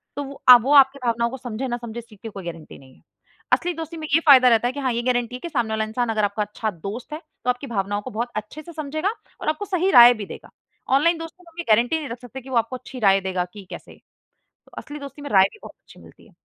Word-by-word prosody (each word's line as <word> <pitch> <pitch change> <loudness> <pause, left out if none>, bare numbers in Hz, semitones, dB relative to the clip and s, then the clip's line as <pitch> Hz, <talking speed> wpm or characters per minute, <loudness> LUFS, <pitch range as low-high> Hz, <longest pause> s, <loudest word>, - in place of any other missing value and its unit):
तो 285 - -3
वो 275 0 -10
अब 245 -2 +10
वो 280 +3 +2
आपके 275 0 +6
भावनाओं 235 0 +1
को 265 - -7
समझे 245 +1 -5
ना 240 -1 -2
समझे, 235 -1 -7
इस 230 - -12
चीज़ 210 -2 -17
की 225 - -7
कोई 195 -4 -9
गारंटी 165 -2 -8
नहीं 130 -1 -18
है। - - -25 0.5
असली 355 0 +2
दोस्ती 325 +1 -7
में 310 - -6
ये 325 - +6
फ़ायदा 255 -3 +8
रहता 230 +1 +3
है 245 - -1
कि 285 - -6
हाँ 260 -2 0
ये 235 - -1
गारंटी 245 0 -1
है - - -7
कि 340 - -6
सामने 240 -7 -1
वाला 220 0 0
इंसान 230 +2 -2
अगर 215 -1 0
आपका 205 +1 0
अच्छा 210 +1 -4
दोस्त 200 - -8
है 305 - -5 0.2
तो 250 - -1
आपकी 250 +3 -1
भावनाओं 205 -3 -2
को - - -8
बहुत 235 +3 -3
अच्छे 215 +8 -6
से 340 +2 -12
समझेगा 310 +4 -2 0.3
और - - -1
आपको 315 +7 -2
सही 380 -1 0
राय 240 -3 +9
भी 215 -3 -7
देगा। - - -11 0.5
ऑनलाइन 335 +4 +3
दोस्तों 330 +2 -10
में 335 - -18
आप 340 - -14
ये - - -2
गारंटी 245 +9 +2
नहीं 290 -5 -6
रख 235 +1 -7
सकते 255 +2 -9
कि 265 - -13
वो 255 - -3
आपको 230 +3 0
अच्छी 255 0 -9
राय 195 -2 +4
देगा 185 -1 -2
कि 205 -2 -11
कैसे। - - -10
तो - - -32 0.6
असली 295 +1 -8
दोस्ती 285 +1 -10
में 285 - -7
राय 190 -2 +6
भी 430 - -16
बहुत - - -10
अच्छी - - -18
मिलती - - -18
है। - - -22
245 Hz, 290 wpm, -22 LUFS, 220-290 Hz, 0.6 s, अब